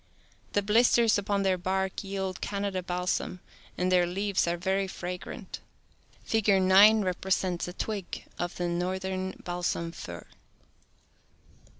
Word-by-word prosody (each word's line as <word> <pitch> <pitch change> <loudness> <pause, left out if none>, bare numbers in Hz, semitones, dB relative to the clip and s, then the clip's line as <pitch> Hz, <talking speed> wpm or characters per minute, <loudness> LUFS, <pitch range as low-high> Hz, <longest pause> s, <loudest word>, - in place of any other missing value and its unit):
The 205 - +2
blisters 225 +1 +4
upon 200 0 0
their 190 -1 +2
bark 190 +2 -1
yield 195 -1 -4
Canada 200 -2 -2
balsam, 180 0 -2 0.4
and 180 +1 +1
their 180 -1 +4
leaves 195 +1 0
are 170 0 0
very 190 +2 0
fragrant. 180 -1 -6 0.6
Figure 210 -3 +3
9 200 +3 +7
repre 185 +1 -3
sents 180 -2 +1
a 180 - -6
twig 200 -2 -4
of 175 0 -2
the 175 - -2
northern 185 +2 -2
balsam 175 -1 -2
fir. 85 - -8
190 Hz, 125 wpm, -28 LUFS, 180-200 Hz, 0.6 s, 9